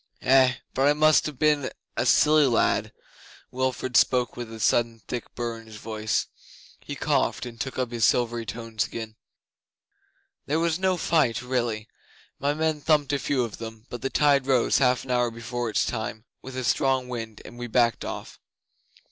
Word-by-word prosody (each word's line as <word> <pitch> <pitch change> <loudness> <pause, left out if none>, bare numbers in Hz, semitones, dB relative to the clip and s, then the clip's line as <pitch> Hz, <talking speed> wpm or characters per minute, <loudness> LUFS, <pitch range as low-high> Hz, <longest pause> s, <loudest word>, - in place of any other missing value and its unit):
Eh, 130 -1 +5 0.2
but 135 +2 +2
I 145 - +5
must 155 +1 +4
ha' 150 -4 -7
been 150 -2 +2 0.3
a - - 0
silly 150 -1 +5
lad.' 120 -3 +1 0.6
Wilfrid 130 -1 -2
spoke 125 0 +3
with 120 -2 -6
a 110 - -8
sudden 115 0 +1
thick 120 -2 -6
burr 115 -1 -3
in 115 - -15
his 110 - -11
voice. 110 0 -2 0.5
He - - -7
coughed, - - 0
and 115 -1 -8
took 135 - -4
up 125 -2 -1
his 120 -2 -2
silvery 120 0 +2
tones 115 -1 -3
again. 110 -1 -6 1.3
'There 150 - +1
was 165 0 0
no 185 -1 +1
fight 130 -10 +1
really. 120 -4 -2 0.5
My 145 +1 0
men 155 -1 0
thumped 150 -2 +2
a 140 - +1
few 130 -2 0
of 115 -3 -6
them, 110 0 -9
but 120 - -6
the 135 - -1
tide 140 -2 +3
rose 130 -2 +3
half 125 -2 +2
an 130 - -6
hour 125 -1 +2
before 115 +1 -4
its 105 - +1
time, 110 -1 -4 0.2
with 130 -1 -8
a 130 - -2
strong 130 +1 +1
wind, 115 -3 -6
and 120 - -11
we 120 - -4
backed 120 -1 +2
off. - - -7
125 Hz, 180 wpm, -26 LUFS, 115-135 Hz, 1.3 s, Eh